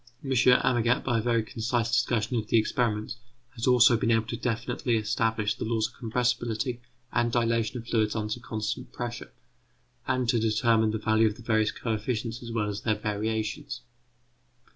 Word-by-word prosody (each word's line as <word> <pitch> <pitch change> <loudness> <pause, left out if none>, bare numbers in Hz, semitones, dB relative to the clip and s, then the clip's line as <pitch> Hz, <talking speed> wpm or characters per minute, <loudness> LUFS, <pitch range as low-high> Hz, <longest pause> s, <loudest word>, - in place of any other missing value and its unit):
M. 135 - -3
Amagat, 125 0 +3
by 120 -3 +1
a - - -1
very 115 -1 +1
concise 115 +1 -1
discussion 120 -2 +1
of 110 -2 -1
the 115 - +3
experiments, 110 0 0 0.4
has 115 -1 -3
also 125 -1 +6
been 115 - 0
able 115 -1 +3
to - - -2
definitely 120 0 -1
establish 110 0 0
the - - -6
laws 110 -1 0
of - - -22
compressibility 120 0 -1 0.3
and 120 +1 +1
dilatation 115 -1 +1
of 115 -1 -8
fluids 110 -2 +1
under 110 +2 -2
constant 115 +2 -4
pressure, 120 -1 -6 0.8
and 130 -1 0
to 120 -1 +2
determine 110 0 +2
the 110 - -1
value 110 +1 +3
of 105 - -2
the 120 - -13
various 110 -2 +2
coefficients 115 +1 -3
as 120 -1 -7
well 110 -2 -1
as 105 0 -4
their 110 -2 +1
variations. 110 +1 -3
115 Hz, 170 wpm, -27 LUFS, 110-120 Hz, 0.8 s, also